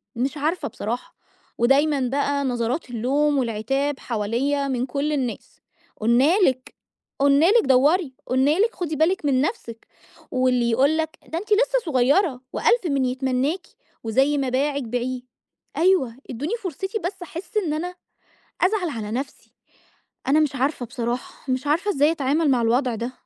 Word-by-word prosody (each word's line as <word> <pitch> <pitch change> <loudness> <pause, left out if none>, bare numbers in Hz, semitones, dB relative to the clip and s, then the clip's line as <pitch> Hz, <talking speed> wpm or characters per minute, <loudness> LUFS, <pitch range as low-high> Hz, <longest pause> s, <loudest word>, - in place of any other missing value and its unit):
مش 265 +5 -2
عارفة 315 +5 -1
بصراحة. 230 +2 -5 0.4
ودايمًا 275 +4 +3
بقى 280 +1 0
نظرات 245 +3 -2
اللوم 275 +5 +1
والعتاب 270 +4 -1
حواليَّ 250 +6 -1
من 255 -1 -1
كل 285 +3 -2
الناس. 255 -5 -4 0.4
"قُلنا 250 - +3
لِك، 260 - +1 0.4
قُلنا 280 +2 +4
لِك 465 +1 +4
دوَّري"، 275 +4 +3
"قُلنا 275 +7 +2
لِك 455 +2 +2
خُدي 325 -4 -3
بالِك 320 +3 +1
من 265 -2 +2
نفسِك". 255 - -4 0.4
واللي 250 -2 +2
يقول 275 +7 +3
لك 320 0 -2
"ده 325 - -4
أنتِ 410 - -5
لسه - - +3
صغيرة 270 +1 +2
وألف 475 -6 +2
من 275 -3 +1
يتمناكِ، 260 +6 -1 0.4
وزي 270 +6 +2
ما 270 -2 0
باعِك 280 +2 0
بيعيه". 245 +2 -3 0.6
أيوه، 335 -10 +3
ادوني 285 - -3
فرصتي 385 +5 -3
بس 365 +1 -5
أحس 355 +5 -7
إن 345 -8 0
أنا 355 +4 -4 0.7
أزعل 370 -2 +2
على 220 -6 -5
نفسي. 265 +4 -6 0.7
أنا 285 +3 +4
مش 295 -3 +1
عارفة 265 -1 -1
بصراحة، 240 +3 -4
مش 260 +3 -2
عارفة 345 +8 +1
إزاي 295 +1 +3
أتعامل 295 0 +1
مع 245 -2 +2
الوضع 245 +1 +1
ده. 235 +3 -4
275 Hz, 150 wpm, -23 LUFS, 250-315 Hz, 0.7 s, قُلنا